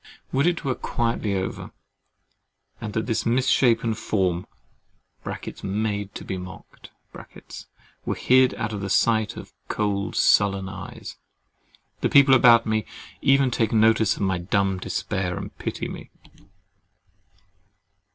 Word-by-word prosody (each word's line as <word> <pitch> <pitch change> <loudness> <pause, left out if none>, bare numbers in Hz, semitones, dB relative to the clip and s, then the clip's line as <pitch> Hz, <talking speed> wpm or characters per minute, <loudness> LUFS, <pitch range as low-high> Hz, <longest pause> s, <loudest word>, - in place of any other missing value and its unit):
Would 140 +5 +2
it 170 -3 -1
were 130 - +1
quietly 115 -5 -2
over; 95 0 -4 1.1
and 105 - -5
that 110 - -1
this 115 -2 -1
misshapen 115 -2 +2
form 95 -5 -1 1.1
(made 100 0 -3
to - - -7
be 95 - -4
mocked) 90 +1 -12 1.1
were - - -2
hid 130 0 +3
out 110 0 -3
of 100 - -4
the 100 - -4
sight 110 +2 +1
of - - -10
cold, 100 -2 -2
sullen 100 -2 +3
eyes! 95 -1 -9 0.8
The - - 0
people 140 -1 +6
about 120 -2 +6
me 110 0 0 0.4
even 135 -1 +3
take 115 -2 0
notice 110 -1 +3
of - - -4
my 95 -2 0
dumb 95 +1 0
despair, 90 -1 -3
and - - -7
pity - - -4
me. - - -9
110 Hz, 125 wpm, -24 LUFS, 95-115 Hz, 1.1 s, people